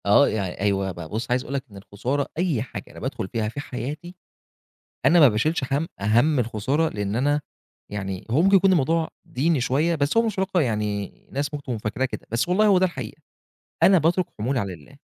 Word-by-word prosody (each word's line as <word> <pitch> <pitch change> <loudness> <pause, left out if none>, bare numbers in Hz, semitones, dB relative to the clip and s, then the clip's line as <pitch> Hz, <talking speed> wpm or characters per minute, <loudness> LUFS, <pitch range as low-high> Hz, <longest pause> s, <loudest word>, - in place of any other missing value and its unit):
آه 105 +8 +6
يعني 100 -4 -3
أيوه 100 -1 +1
بقى، 85 -2 -8
بُصّ 115 +3 -4
عايز 125 +1 +2
أقول 135 - -7
لك 135 -2 -1
إن 100 - -11
الخسارة 125 +9 -3
أي 165 -9 +1
حاجة 125 - -7
أنا - - -11
بادخل - - -4
فيها 110 +1 -2
في 130 - -7
حياتي، 145 +6 -6 0.9
أنا 170 +5 +6
ما 145 - +9
باشيلش 130 +7 0
هَمّ 145 +4 +1
هَمّ 120 +9 +3
الخسارة، 125 +7 0
لأن 105 -3 -3
أنا 145 +4 +2 0.5
يعني 95 -2 -4
هو 140 +8 +3
ممكن 195 +1 +6
يكون 195 0 +4
الموضوع 165 0 +2 0.2
ديني 150 +3 +1
شوية، 145 +7 +1
بس 145 +4 0
هو 230 - +6
مش 220 - 0
في - - -14
الواقع 190 -1 +1
يعني 105 -6 -1 0.2
الناس 145 +2 -3
ممكن 145 - -4
تكون 120 -4 -3
فاكراه 110 +5 -2
كده، 130 - -5
بس 115 +8 0
والله 200 +4 +3
هو 200 -3 +5
ده 185 - +4
الحقيقة؛ 140 -4 -7 0.6
أنا 190 - +7
باترك 170 +3 +2
حمولي 125 +5 0
على 100 -3 -3
الله، 75 -4 -15
135 Hz, 210 wpm, -24 LUFS, 105-160 Hz, 0.9 s, ما